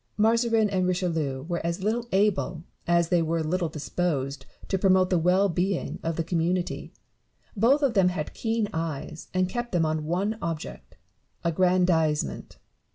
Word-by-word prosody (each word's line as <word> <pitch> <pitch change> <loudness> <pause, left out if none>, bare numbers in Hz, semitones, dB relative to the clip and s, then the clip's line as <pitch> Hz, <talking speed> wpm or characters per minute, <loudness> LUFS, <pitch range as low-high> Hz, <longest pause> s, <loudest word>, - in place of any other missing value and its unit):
Mazarin 225 0 +3
and 185 -2 +1
Richelieu 165 -7 -1
were 170 0 -3
as 170 +3 -2
little 230 +3 0
able 190 -4 +1 0.2
as 170 -1 +3
they 175 -1 +3
were 165 0 0
little 170 +1 -1
disposed 145 -3 -2 0.2
to 190 - 0
promote 185 -1 +3
the 180 - +3
well 180 +4 +3
being 185 +1 -1
of 165 0 -2
the 165 - -1
community; 175 +2 -1 0.6
both 255 +8 +3
of 270 -4 +3
them 190 -4 +4
had 155 -4 -4
keen 225 -2 -1
eyes, 160 -1 -4
and 185 0 +1
kept 240 +4 -4
them 170 -2 +2
on 155 0 -1
one 195 +7 -1
object 165 -2 -6 0.2
— - - -44
aggrandisement. 170 -3 +1
180 Hz, 160 wpm, -26 LUFS, 165-195 Hz, 0.6 s, them